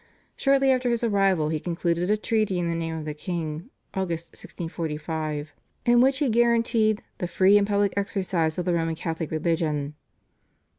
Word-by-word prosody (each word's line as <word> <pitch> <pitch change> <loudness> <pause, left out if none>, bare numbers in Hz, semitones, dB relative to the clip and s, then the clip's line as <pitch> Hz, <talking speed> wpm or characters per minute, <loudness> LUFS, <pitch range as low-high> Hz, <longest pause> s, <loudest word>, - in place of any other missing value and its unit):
Shortly 275 -1 +3
after 255 -1 +1
his 235 0 0
arrival 195 -8 +2
he 155 -1 -1
concluded 170 +1 -1
a 210 - +3
treaty 215 -3 0
in 175 -1 -1
the 170 - 0
name 165 -1 -3
of 155 - -6
the 150 - -3
king 160 +3 -5 0.2
(Aug. 190 -2 -2
1645) 160 -2 -5 0.3
in 240 0 +5
which 265 +1 +4
he 290 0 +1
guaranteed 230 -2 +2 0.2
"the 180 - -2
free 190 +3 +4
and 205 -1 +4
public 200 -1 +1
exercise 185 -5 -1
of 180 - -2
the 180 - +1
Roman 165 -1 0
Catholic 160 -1 -4
religion." 155 -3 -1
175 Hz, 165 wpm, -25 LUFS, 160-215 Hz, 0.3 s, in